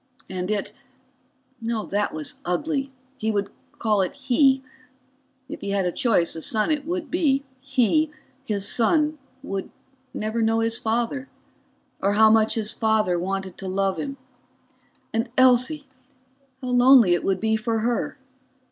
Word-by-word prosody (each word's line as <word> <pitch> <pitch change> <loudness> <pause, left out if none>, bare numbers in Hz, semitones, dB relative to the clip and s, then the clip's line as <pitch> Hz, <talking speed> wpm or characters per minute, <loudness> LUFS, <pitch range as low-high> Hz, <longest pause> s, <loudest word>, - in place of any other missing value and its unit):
And 185 0 -4
it 210 -2 -2 0.9
that 215 -3 -1
was 155 -1 -2
ugly; 275 - -1 0.3
he 220 - -1
would 205 -2 -1 0.3
call 210 -3 +2
it 185 - -2
"he"; 270 0 +3 0.8
if 300 - -8
he 200 - -4
had 200 -1 0
a 180 - 0
choice 195 -9 +1
a 160 - -6
son 215 - 0
it 300 -1 -1
would 350 -1 -3
be 285 -6 +2 0.2
he, 270 +3 +2 0.3
his 200 -5 -2
son, 300 +7 +2 0.2
would 195 -7 -4 0.4
never 220 +2 -2
know 225 0 +2
his 225 0 0
father, 240 +5 -1 0.7
or 200 +1 +2
how 220 +1 +6
much 220 0 +3
his 215 -2 -1
father 215 -6 +1
wanted 190 0 -4
to 195 - -6
love 195 0 0
him. 275 -1 -4 1.0
And 225 +2 -1
Elsie 260 +4 +4 0.8
how 255 - -3
lonely 245 -5 +6
it 175 - 0
would 190 -1 0
be 220 +1 +1
for 220 0 -1
her. 240 +4 -1
225 Hz, 145 wpm, -24 LUFS, 200-265 Hz, 1.0 s, how